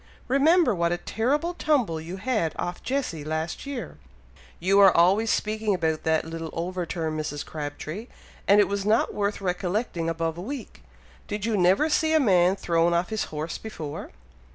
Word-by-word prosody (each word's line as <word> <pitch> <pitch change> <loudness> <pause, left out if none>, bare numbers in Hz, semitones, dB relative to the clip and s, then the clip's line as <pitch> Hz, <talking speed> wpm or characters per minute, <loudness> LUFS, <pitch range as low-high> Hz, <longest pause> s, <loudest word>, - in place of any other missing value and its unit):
Remember 285 +2 +4
what 170 -2 0
a 175 - 0
terrible 290 - -1
tumble 255 - +1
you 170 +4 -7
had 200 - 0
off 175 0 -4
Jessy 255 - -2
last 160 - -3
year!" 275 -4 -6 0.6
"You 195 +3 +3
are 195 -2 +8
always 190 +7 +4
speaking 215 -2 0
about 160 -3 0
that 160 -1 +2
little 165 0 -5
overturn, 170 -2 -3
Mrs. 150 -1 -4
Crabtree; 155 +7 -6 0.4
and 200 +1 +6
it 205 - +5
was 200 0 -2
not 215 +3 +2
worth 205 0 -1
recollecting 180 -1 -1
above 165 0 -2
a - - -4
week! 270 +7 -7 0.5
Did 210 0 -3
you 225 -2 +1
never 190 - +4
see 315 0 +2
a 315 - +5
man 185 -7 +4
thrown 170 -2 +1
off 175 +1 0
his 220 -1 -1
horse 155 +2 -5
before?" 160 -10 -7
185 Hz, 170 wpm, -26 LUFS, 165-220 Hz, 0.6 s, are